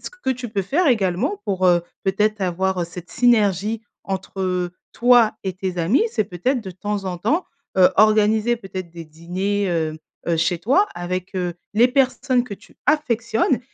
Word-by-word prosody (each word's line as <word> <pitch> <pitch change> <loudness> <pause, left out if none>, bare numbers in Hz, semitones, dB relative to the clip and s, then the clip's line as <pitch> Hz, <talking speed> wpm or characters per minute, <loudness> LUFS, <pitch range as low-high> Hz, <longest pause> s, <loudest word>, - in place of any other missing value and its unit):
ce - - -6
que - - -4
tu 250 -2 -3
peux 200 -2 -1
faire 305 - +1
également 225 - +1
pour, 190 -3 +1
heu, 175 -1 +4 0.2
peut-être 210 +2 +1
avoir, 185 +1 0
heu, - - 0
cette 175 +1 -10
synergie, 215 -3 +2 0.2
entre 185 -2 -2 0.2
toi 240 -2 +5
et 190 - -1
tes 185 0 -4
amis 180 - +2
c'est 215 - 0
peut-être 215 +7 -1
de 190 - -7
temps 200 +2 -4
en 180 -2 -3
temps, 295 - 0 0.3
heu, 185 -1 +6
organiser 215 +2 +4
peut-être 190 -5 -7
des 170 -1 -9
dîners, 180 +6 -2
hem, 160 -3 -1 0.3
heu, 165 - +2
chez 170 +1 +1
toi, 275 - +3
avec, 185 +2 -4
heu, 180 -2 -2 0.2
les 235 +3 +5
personnes 260 -1 +2
que 205 - -7
tu - - -20
affectionnes 245 -4 +1
200 Hz, 175 wpm, -21 LUFS, 180-235 Hz, 0.3 s, heu